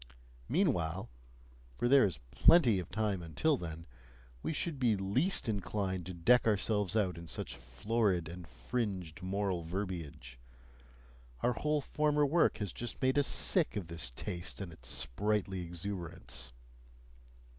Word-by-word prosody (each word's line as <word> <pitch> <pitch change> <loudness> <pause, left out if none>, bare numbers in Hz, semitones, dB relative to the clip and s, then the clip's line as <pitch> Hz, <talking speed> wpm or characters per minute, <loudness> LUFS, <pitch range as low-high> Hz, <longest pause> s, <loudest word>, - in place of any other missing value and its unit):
Meanwhile 95 - +1 0.6
for 120 - 0
there 135 -1 +7
is 90 -10 -2
plenty 125 - +6
of 90 - -6
time 105 -4 -1
until 85 - +1
then 80 -6 -6 0.6
we - - -2
should 155 -1 -2
be 120 -4 +3
least 120 - +1
inclined 95 -3 -2
to 90 - -5
deck 120 +9 +4
ourselves 105 -1 +1
out 95 -6 +1
in 85 - -9
such - - -4
florid 90 - 0
and 85 +1 -8
fringed 90 - -3
moral 95 -1 -1
verbiage; 80 -8 -5 1.0
our 125 - +2
whole 150 +7 0
former 150 +1 +2
work 160 +4 +3
has 105 -5 -3
just 120 -2 -6
made 130 +2 +3
us 140 - +2
sick 175 - +3
of 95 -5 -4
this 85 -7 -2
taste 85 +8 -5
and 95 -4 -6
its 80 - -8
sprightly 95 - 0
exuberance. 85 -9 -5
95 Hz, 140 wpm, -33 LUFS, 85-120 Hz, 1.0 s, there